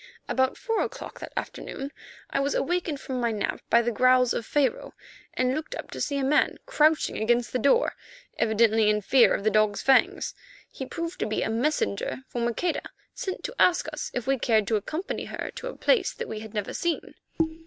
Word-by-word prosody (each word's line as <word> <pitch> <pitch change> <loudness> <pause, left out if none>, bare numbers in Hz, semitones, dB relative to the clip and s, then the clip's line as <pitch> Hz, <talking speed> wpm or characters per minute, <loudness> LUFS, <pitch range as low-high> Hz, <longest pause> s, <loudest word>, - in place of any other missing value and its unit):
About 260 0 +1
four 455 -3 -1
o'clock - - -5
of - - -12
that - - -8
afternoon 275 +1 -5 0.4
I - - +1
was 275 +1 0
awakened 340 -3 -1
from 260 -2 -4
my 235 -1 +1
nap 210 -2 -2
by 235 +1 +5
the 240 - 0
growls 255 +1 +4
of 230 - -3
Pharaoh, 295 - 0 0.4
and 255 0 +1
looked 310 - -4
up - - -7
to - - -6
see 285 - -1
a 275 - 0
man 280 +3 +2
crouching 315 -10 +2
against 235 +2 +1
the 255 - +1
door, 280 - +3 0.5
evidently 220 -1 +4
in 210 0 +2
fear 250 +5 +5
of - - -4
the 215 - +3
dog's 215 0 +2
fangs. 355 +9 +3 0.4
He 265 - -6
proved 335 +1 -5
to - - 0
be 215 - -1
a 220 - -1
messenger 255 -1 -1
from 235 -1 -2
Maqueda, 310 +9 -1 0.3
sent 375 - -5
to 480 - -5
ask 350 -3 +4
us 305 - -4
if 245 -2 -3
we 270 0 +1
cared 220 -3 +3
to 225 - +2
accompany 310 - -3
her - - -5
to - - -5
a - - -7
place 430 -7 +2
that 475 - -6
we 215 - -5
had 220 0 -10
never 210 -2 -2
seen. 340 -1 -2
260 Hz, 205 wpm, -26 LUFS, 225-315 Hz, 0.5 s, by